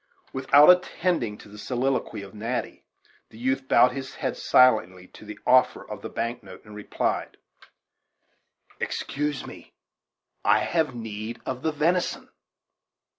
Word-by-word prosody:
Without 135 +3 +5
attending 180 - 0
to - - -14
the 105 +1 -13
soliloquy 125 -3 -2
of 100 - -12
Natty, 115 +4 -4 0.5
the - - -15
youth 130 +2 -1
bowed 125 - +5
his 135 -1 -7
head - - -3
silently 95 -8 +3
to - - -14
the 105 0 -9
offer 125 0 +3
of 105 -2 -8
the - - -6
bank 120 +1 -3
note, 100 +1 -13
and 105 - -13
replied: 105 - -3 1.4
"Excuse 150 0 -3
me: - - -12 0.7
I - - +4
have 160 -6 0
need 110 0 -6
of 130 -1 -4
the 160 - 0
venison." 165 +4 0
125 Hz, 135 wpm, -25 LUFS, 105-135 Hz, 1.4 s, Without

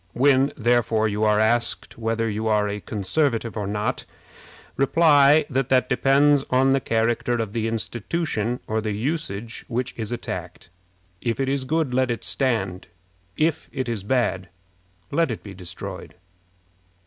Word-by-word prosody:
When, 135 +1 +4
therefore, 115 -1 +2
you 105 0 -1
are 105 0 +3
asked 115 +2 0
whether 115 0 -1
you 110 +1 -2
are 105 -1 +2
a 105 0 -3
Conservative 115 +4 -1
or 105 -3 -3
not, 105 +1 -2 0.7
reply 145 0 +5
that 135 0 -1
that 130 -1 +3
depends 140 +1 +4
upon 135 0 +2
the 135 - +3
character 115 0 0
of 115 -4 -2
the 115 -1 -1
institution 120 +1 -2
or 110 0 -1
the 105 -1 -2
usage 115 -2 -3
which 125 +2 -2
is 110 -1 -4
attacked. 90 -7 -6 0.5
If 115 0 -2
it 135 - 0
is 135 -1 -1
good, 155 -2 0
let 130 0 +2
it 120 - -3
stand. 105 -9 -1 0.5
If 160 0 0
it 130 -3 -3
is 115 -4 -2
bad, 95 -4 0 0.6
let 165 -3 +2
it 115 - -5
be 100 - -9
destroyed. 90 +1 -7
115 Hz, 150 wpm, -23 LUFS, 105-135 Hz, 0.7 s, reply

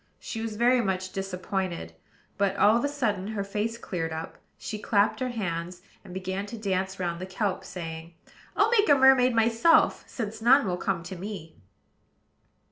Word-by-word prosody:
She 225 - -6
was 225 -1 -4
very 245 +3 +4
much 185 -3 -2
disappointed; 185 - -3 0.4
but, 200 -1 +1
all 210 +2 +5
of 235 - +1
a - - +2
sudden, 215 -9 -1
her 215 -2 -3
face 210 +3 -3
cleared 165 -7 -4
up, 160 +1 -6 0.2
she 215 - -6
clapped 205 +1 +2
her 255 -1 -1
hands, 180 -5 -4 0.2
and 195 - -12
began 190 +2 -4
to 230 - -7
dance 190 -2 -2
round 170 -1 -2
the 185 - -5
kelp, 190 0 -2
saying: 165 -1 -7 0.4
"I'll 415 +3 +4
make 430 -3 +4
a 285 - +8
mermaid 260 -2 +5
myself, 230 +8 +4
since 220 -2 -5
none 255 +3 +6
will 180 -2 -1
come 180 -2 -2
to 175 +2 -7
me." 180 -4 -7
200 Hz, 175 wpm, -27 LUFS, 185-230 Hz, 0.4 s, a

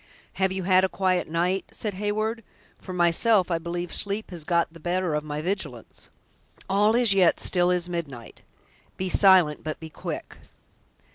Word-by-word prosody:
"Have 190 0 +2
you 190 0 -3
had 185 0 +4
a 190 - +2
quiet 185 -2 0
night?" 175 +4 -1
said 210 -2 -3
Heyward; 215 +3 -2 0.4
"for - - -9
myself, 180 +3 +3
I 165 - 0
believe 175 +1 -5
sleep 205 +1 -2
has 170 -3 -6
got 170 0 0
the 165 - -13
better 175 0 -1
of 150 0 -1
my 150 0 -5
vigilance." 190 +3 -5 0.6
"All 205 +3 +2
is 240 -4 +4
yet 185 -3 +3
still 180 -1 +2
as 180 -1 0
midnight. 150 -9 -7 0.6
Be 185 0 -3
silent, 185 -6 +4
but 155 0 -5
be 160 -1 -10
quick." - - -7
180 Hz, 165 wpm, -25 LUFS, 170-195 Hz, 0.6 s, had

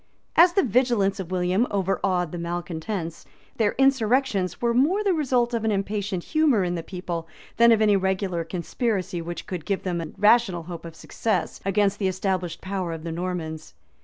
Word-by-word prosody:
} - - -45
As 345 +2 +7
the 390 - +3
vigilance 225 -4 +2
of 185 -3 -5
William 185 +5 +1
overawed 190 -3 0
the 175 - -5
malecontents, 170 +1 -4 0.3
their 215 -3 +2
insurrections 255 -7 +2
were 235 -1 +1
more 320 - +3
the 395 -3 +2
result 250 -6 +1
of 230 -2 -1
an 220 - +1
impatient 200 -2 -2
humor 305 -10 +2
in 175 -1 -1
the 170 - -3
people, 170 -1 -5 0.3
than 235 +1 +7
of 220 -1 +4
any 210 -1 +4
regular 190 -2 0
conspiracy 185 +1 -2
which 170 +1 -6
could 180 -4 -5
give 195 +2 -2
them 175 -2 -2
a 165 - -5
rational 210 -4 +4
hope 170 0 -8
of 165 -1 -9
success 195 +1 -2
against 200 0 +1
the 195 - +1
established 185 -2 -2
power 185 -3 -3
of 160 -1 -7
the 165 - -4
Normans. 165 -2 -5
195 Hz, 185 wpm, -25 LUFS, 175-230 Hz, 0.3 s, As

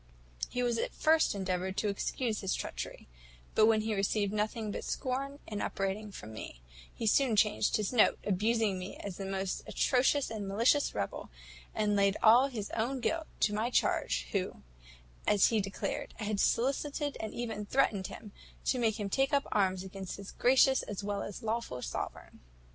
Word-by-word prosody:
He 250 - -2
at 240 -2 0
first 315 -7 +3
endeavoured 190 0 -2
to 210 - +1
excuse 215 +2 -1
his 190 -2 0
treachery; - - -6 0.5
but 215 - +5
when 220 -1 +4
he 220 0 -1
received 200 0 0
nothing 215 0 -1
but - - -4
scorn 275 +2 -2
and 210 -1 -4
upbraiding 195 +2 -2
from 110 - -9
me, 85 - -8 0.3
he 230 - -5
soon 235 +2 +4
changed 210 0 +3
his 215 +2 -2
note, 225 - +5
abused 215 +4 +1
me 190 -3 -1
as 195 -3 -6
the 195 - -4
most 195 -1 -2
atrocious 265 +1 +2
and 210 -3 -4
malicious 230 +8 +2
rebel, 100 - -3 0.5
and 210 -1 +1
laid 200 0 +3
all 240 +5 +7
his 220 -7 -5
own 245 +4 -1
guilt 320 +6 -1
to 210 - +3
my 220 +3 0
charge, - - +1
who, - - -2 0.6
as 205 -2 +5
he 220 -2 +2
declared, 195 0 -4
had 210 -1 -2
solicited, 280 +5 +1
and 220 - -5
even 225 -3 -3
threatened 210 -8 +2
him, 215 -2 -10 0.3
to 255 - +1
make 225 -2 +1
him 205 - -2
take 270 +8 +1
up 280 -1 +2
arms 190 -2 +1
against 190 -1 -7
his 200 -1 -8
gracious 265 +1 +4
as 205 -1 -6
well 200 0 -2
as 205 - -6
lawful 225 - -2
sovereign. - - -6
215 Hz, 175 wpm, -32 LUFS, 195-240 Hz, 0.6 s, all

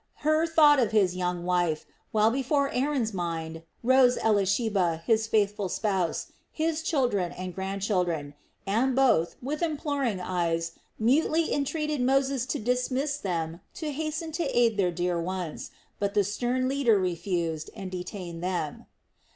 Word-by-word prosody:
Hur 310 +2 +3
thought 300 -3 +6
of 235 -4 +2
his 195 -5 +2
young 180 -1 -2
wife, 175 -3 +1 0.3
while 215 +1 +4
before 275 +2 +1
Aaron's 255 -4 0
mind 165 -3 -4 0.2
rose 255 0 +5
Elisheba, 200 -4 +1
his 225 -1 +2
faithful 205 -2 +1
spouse, 190 -4 -1 0.2
his 320 0 -1
children 245 - 0
and 185 0 -6
grandchildren; 190 -6 -1 0.3
and 235 +6 +1
both, 250 -11 +3
with 300 +5 -3
imploring 285 - -1
eyes, 170 -2 -1 0.3
mutely 310 +8 +2
entreated 300 0 -1
Moses 265 0 +1
to - - -1
dismiss 255 +5 0
them 170 - -3
to 310 -2 -3
hasten 310 +2 -3
to 330 +2 -2
aid 235 -2 +4
their 195 -3 +2
dear 175 0 -1
ones; 180 -2 -4 0.3
but 200 -1 -1
the 205 - +4
stern 245 +6 -1
leader 260 -5 +3
refused 170 -3 -2
and 195 -3 -6
detained 180 -2 -6
them. 175 -5 -3
210 Hz, 140 wpm, -27 LUFS, 180-270 Hz, 0.3 s, thought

